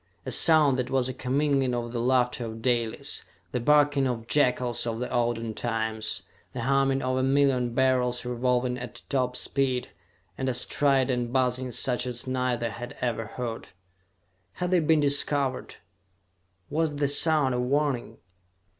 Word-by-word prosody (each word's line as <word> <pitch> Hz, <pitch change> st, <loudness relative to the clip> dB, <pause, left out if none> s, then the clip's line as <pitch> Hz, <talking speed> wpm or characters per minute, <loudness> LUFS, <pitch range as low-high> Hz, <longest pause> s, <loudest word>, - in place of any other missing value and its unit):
A -, -, -4 dB
sound 150 Hz, -5 st, +4 dB
that 125 Hz, 0 st, -2 dB
was 130 Hz, -1 st, +1 dB
a -, -, -4 dB
commingling 135 Hz, 0 st, 0 dB
of 120 Hz, -1 st, -4 dB
the 120 Hz, -, -2 dB
laughter 125 Hz, 0 st, +1 dB
of 110 Hz, 0 st, -8 dB
Dalis, 120 Hz, -3 st, -1 dB, 0.3 s
the 125 Hz, -, -1 dB
barking 145 Hz, +1 st, +3 dB
of 115 Hz, -3 st, -3 dB
jackals 125 Hz, -3 st, +1 dB
of 115 Hz, -1 st, -3 dB
the 125 Hz, -, -2 dB
olden 115 Hz, -2 st, -1 dB
times, 110 Hz, -1 st, -3 dB, 0.3 s
the 125 Hz, -, -4 dB
humming 135 Hz, +1 st, +1 dB
of 130 Hz, 0 st, 0 dB
a -, -, +1 dB
million 130 Hz, -3 st, +2 dB
Beryls 125 Hz, -2 st, +1 dB
revolving 125 Hz, +1 st, 0 dB
at 125 Hz, -2 st, -8 dB
top 125 Hz, -2 st, 0 dB
speed, 130 Hz, -1 st, -1 dB, 0.5 s
and 130 Hz, 0 st, -1 dB
a 125 Hz, -, -1 dB
strident 130 Hz, -3 st, +1 dB
buzzing 130 Hz, 0 st, 0 dB
such 125 Hz, +1 st, 0 dB
as 120 Hz, -1 st, -4 dB
neither 125 Hz, -3 st, -1 dB
had 120 Hz, +2 st, -8 dB
ever 115 Hz, -3 st, -2 dB
heard. 115 Hz, 0 st, -6 dB, 0.8 s
Had 180 Hz, -, -3 dB
they 180 Hz, -, +4 dB
been 155 Hz, -1 st, +3 dB
discovered? 140 Hz, -2 st, 0 dB, 1.0 s
Was 155 Hz, 0 st, 0 dB
the 145 Hz, 0 st, 0 dB
sound 145 Hz, -1 st, +5 dB
a 125 Hz, -, -1 dB
warning? 135 Hz, 0 st, -1 dB
125 Hz, 155 wpm, -26 LUFS, 120-135 Hz, 1.0 s, sound